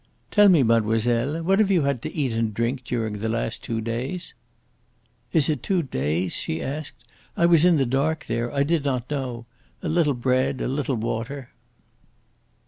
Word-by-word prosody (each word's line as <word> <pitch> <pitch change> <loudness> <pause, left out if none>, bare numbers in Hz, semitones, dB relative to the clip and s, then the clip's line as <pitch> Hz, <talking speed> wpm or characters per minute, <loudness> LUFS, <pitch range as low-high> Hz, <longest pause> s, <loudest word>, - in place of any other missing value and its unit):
"Tell 205 -1 +6
me, 165 -7 +5
mademoiselle, 115 +6 +1
what 195 +4 +3
have 215 -2 +4
you 180 -6 +3
had 140 -4 0
to - - -5
eat 140 -5 -1
and 115 -2 -1
drink 120 +4 -1
during 110 -4 -2
the 110 +2 -2
last 115 0 -2
two 115 -1 -2
days?" 125 +11 -4 1.0
"Is 155 -4 +3
it 150 -5 0
two 185 -3 0
days?" 85 - -1
she 80 - -3
asked. 145 - -6 0.3
"I 170 - +4
was 170 -1 +5
in 175 -3 +5
the 135 - +2
dark 140 +6 0
there. 120 +1 -2
I 140 0 +1
did 160 0 +1
not 130 -2 -2
know. 125 -5 -3 0.4
A - - -2
little 155 -4 +2
bread, 130 +1 +1
a - - -1
little 135 0 -1
water." 120 +4 -4
130 Hz, 180 wpm, -24 LUFS, 115-155 Hz, 1.0 s, Tell